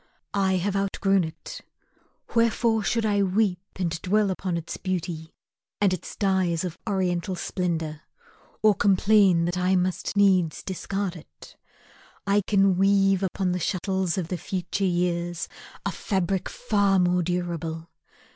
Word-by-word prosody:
I 195 -1 +2
have 190 +2 0
outgrown 195 -1 +1
it. 160 - -9 0.7
Wherefore 230 -1 +2
should 230 +2 0
I 205 -1 +2
weep 195 -1 +1 0.2
And 170 -3 -2
dwell 205 +1 +2
up 190 +1 -5
on 175 -2 0
its 165 0 -5
beauty, 175 -4 -3 0.5
and 200 -3 +3
its 180 - -6
dyes 190 -4 +1
Of 175 -3 -5
Oriental 185 -1 0
splendour, 165 -4 -3 0.6
or 215 -1 +6
complain 195 -3 +4
That 175 +1 -1
I 185 +1 +2
must 185 +2 -1
needs 185 -5 +3
discard 195 0 -3
it? 165 - -14 0.7
I 200 +1 +3
can 195 -2 +3
weave 195 -1 +4
Upon 190 -1 -1
the 180 - -1
shuttles 185 0 -1
of 175 -3 -2
the 180 - -3
future 185 +3 -2
years 175 -1 -1 0.4
A - - 0
fabric 190 -1 -1
far 200 -5 +1
more 180 0 +3
durable. 170 -2 -3
185 Hz, 140 wpm, -25 LUFS, 175-195 Hz, 0.7 s, or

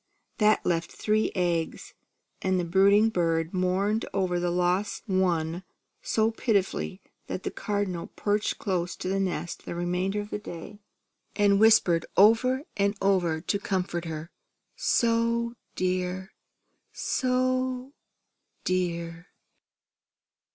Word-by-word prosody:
That 215 0 +3
left 165 -1 0
three 215 0 0
eggs; 175 -3 -1 0.5
and 185 -1 +1
the 175 - -1
brooding 200 +5 +5
bird 165 -4 0
mourned 190 +4 +1
over 185 -2 +1
the 175 0 0
lost 180 +3 0
one 180 -3 0 0.4
so 220 0 +1
pitifully 200 -4 -1 0.2
that 185 - -4
the - - -2
Cardinal 200 -5 -2
perched 205 0 -1
close 180 -4 -2
to - - -6
the 195 +1 0
nest 175 -3 -3
the - - -5
remainder 180 +3 -1
of 205 0 -6
the 210 - -2
day, 190 +1 -9 0.6
and 200 -1 +4
whispered 205 -7 +5
over 245 +6 +5
and 200 0 +1
over 180 -5 +1
for - - +2
her 200 - 0
comfort 180 -4 -2
that - - -5 0.7
she - - +2
was 230 -6 -1 0.9
"So 255 0 0 0.7
dear! 170 -1 -2
190 Hz, 120 wpm, -27 LUFS, 175-215 Hz, 0.9 s, brooding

